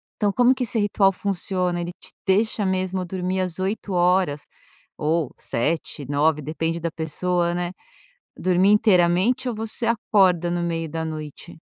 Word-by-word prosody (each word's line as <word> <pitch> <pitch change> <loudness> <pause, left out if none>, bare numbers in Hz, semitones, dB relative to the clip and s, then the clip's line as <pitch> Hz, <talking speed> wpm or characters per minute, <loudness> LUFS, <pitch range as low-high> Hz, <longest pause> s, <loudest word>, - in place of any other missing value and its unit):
Então 205 -2 +1
como 245 +4 +4
que 255 - -2
esse 230 -1 -1
ritual 205 -1 +3
funciona, 185 -2 -2
ele 175 0 -4
te - - -8
deixa 210 +2 +2
mesmo 185 0 -1
dormir 185 +1 -2
às 180 -1 -3
8 195 +2 -2
horas 175 -4 +2 0.5
ou 155 -2 0
7, 145 +1 -2
9 150 +2 +2
depende 160 +3 -2
da 170 0 -2
pessoa, 170 +2 -1
né, 175 0 -2 0.7
dormir 185 +1 +3
inteiramente 210 +5 +3
ou 235 - -4
você 225 +2 -2
acorda 190 -6 +2
no 175 0 -1
meio 165 -1 -2
da 160 +1 -4
noite? 155 +1 -7
180 Hz, 155 wpm, -23 LUFS, 165-195 Hz, 0.7 s, como